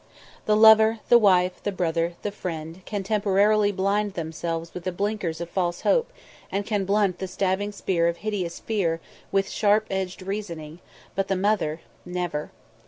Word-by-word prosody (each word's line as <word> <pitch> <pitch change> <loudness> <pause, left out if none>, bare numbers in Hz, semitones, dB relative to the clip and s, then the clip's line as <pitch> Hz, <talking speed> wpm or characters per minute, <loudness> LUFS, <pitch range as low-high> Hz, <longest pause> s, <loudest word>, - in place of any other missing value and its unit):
The 210 - +4
lover, 220 0 +7
the 240 - +8
wife, 185 -3 +3
the 205 - -2
brother, 170 -2 -1
the 205 - -2
friend, 165 -3 -6
can 205 -2 -3
temporarily 205 +1 +3
blind 200 +1 0
themselves 165 0 -4
with 180 - -7
the 185 - 0
blinkers 195 -3 -2
of 170 - -4
false 175 -1 -2
hope - - +2 0.4
and 200 +1 -1
can 205 -3 -1
blunt 200 -1 +1
the 190 - -3
stabbing 190 +2 -1
spear 180 -4 0
of 170 0 -1
hideous 190 -6 -2
fear 180 -7 -1 0.3
with 195 0 +2
sharp 210 +1 +3
edged 190 -1 -3
reasoning, 170 -6 -5 0.3
but 195 0 -1
the 195 - +1
mother 185 -5 0 0.2
never. 175 -4 -3
190 Hz, 165 wpm, -25 LUFS, 170-205 Hz, 0.4 s, the